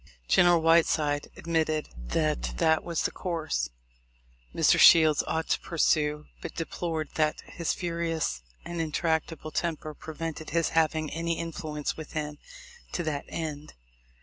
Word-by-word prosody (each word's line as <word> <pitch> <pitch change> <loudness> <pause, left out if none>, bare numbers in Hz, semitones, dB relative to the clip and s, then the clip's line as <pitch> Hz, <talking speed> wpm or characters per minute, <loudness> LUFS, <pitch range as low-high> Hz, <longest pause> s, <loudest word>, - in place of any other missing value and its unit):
General 175 -1 +5
Whiteside 160 -3 +3
admitted 160 -2 0
that - - -1
that 160 -1 +3
was 170 -2 -2
the - - 0
course 160 - -2 0.8
Mr. - - +4
Shields 155 -3 +8
ought 160 0 -1
to - - +2
pursue, 150 -2 +1 0.2
but - - -7
deplored 165 -1 -3
that 155 -1 +1
his 170 - -3
furious 170 - -2 0.2
and 170 -1 -3
intractable 160 0 -1
temper 155 -2 -2
prevented 160 +1 -6
his 170 -1 +1
having 155 -1 +1
any 165 +1 -1
influence 155 -3 -4
with 155 -2 -8
him 150 -1 -4 0.5
to 175 - -1
that 150 -3 -2
end. 155 -2 -5
160 Hz, 130 wpm, -28 LUFS, 150-165 Hz, 0.8 s, Shields